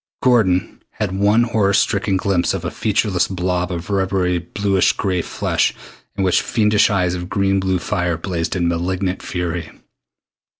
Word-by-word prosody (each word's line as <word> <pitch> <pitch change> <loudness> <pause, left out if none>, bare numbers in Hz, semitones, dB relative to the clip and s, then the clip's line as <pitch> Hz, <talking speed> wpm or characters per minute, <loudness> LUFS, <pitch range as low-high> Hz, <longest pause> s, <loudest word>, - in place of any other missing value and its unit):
Gordon 105 -8 +2
had 105 -3 -3
one 100 +4 +3
horror 110 -4 +1
stricken 100 -1 +1
glimpse 95 -2 0
of - - -5
a - - -2
featureless 105 -4 0
blob 90 -1 -2
of 85 +2 -5
rubbery 95 -2 +1
bluish 95 +2 +1
gray 95 -3 -1
flesh - - -1 0.4
in 100 - -1
which 90 -2 +3
fiendish 105 -2 +2
eyes 90 -3 +1
of 90 0 -5
blue 100 -1 +1
green 95 -1 0
fire 90 -1 -1
blazed 85 0 -3
in 85 -2 0
malignant 90 +2 -1
fury. 90 -2 -3
95 Hz, 155 wpm, -19 LUFS, 90-100 Hz, 0.4 s, one